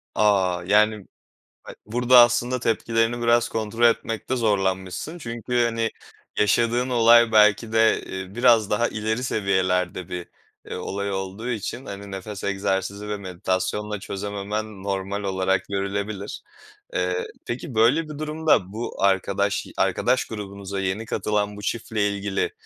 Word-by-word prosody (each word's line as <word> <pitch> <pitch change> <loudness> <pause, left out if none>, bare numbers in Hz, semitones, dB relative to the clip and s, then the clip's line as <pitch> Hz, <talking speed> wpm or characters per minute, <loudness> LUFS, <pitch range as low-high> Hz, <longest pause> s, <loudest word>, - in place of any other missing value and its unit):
A, 95 -4 +2
yani, 105 0 +3 0.6
ha - - -9
burada 125 +3 +5
aslında 120 +1 +4
tepkilerini 115 +1 0
biraz 120 0 +3
kontrol 110 +1 -2
etmekte 115 +1 +1
zorlanmışsın. 95 - -1
Çünkü, 120 -3 -1
hani, 115 -1 -1 0.5
yaşadığın 120 +4 +2
olay 120 -1 +6
belki 105 +1 +4
de, 110 0 +3
eee, 95 +1 -7
biraz 120 -3 +4
daha 115 +3 +2
ileri 110 +3 -2
seviyelerde 95 -5 0
bir, 90 -1 -5 0.4
eee, - - -6
olay 100 +1 -3
olduğu 95 +5 -4
için, 120 +3 -4
hani, 100 -2 -8
nefes 95 +1 -7
egzersizi 100 +1 -2
ve 105 - -2
meditasyonla 95 +2 -2
çözememen 100 +1 -5
normal 100 +1 -3
olarak 95 0 0
görülebilir. 100 +1 -3 0.5
Eee, 90 0 -1 0.2
peki, 125 +2 -5
böyle 120 +9 +4
bir 150 -1 -7
durumda 155 - +1
bu 115 -3 -5
arkadaş 100 +1 +1
arkadaş 125 +1 +1
grubunuza 100 -2 -6
yeni 95 +3 -2
katılan 105 -2 -1
bu 105 - -8
çiftle 110 -2 -1
ilgili, 100 -1 -2
105 Hz, 130 wpm, -24 LUFS, 95-115 Hz, 0.6 s, olay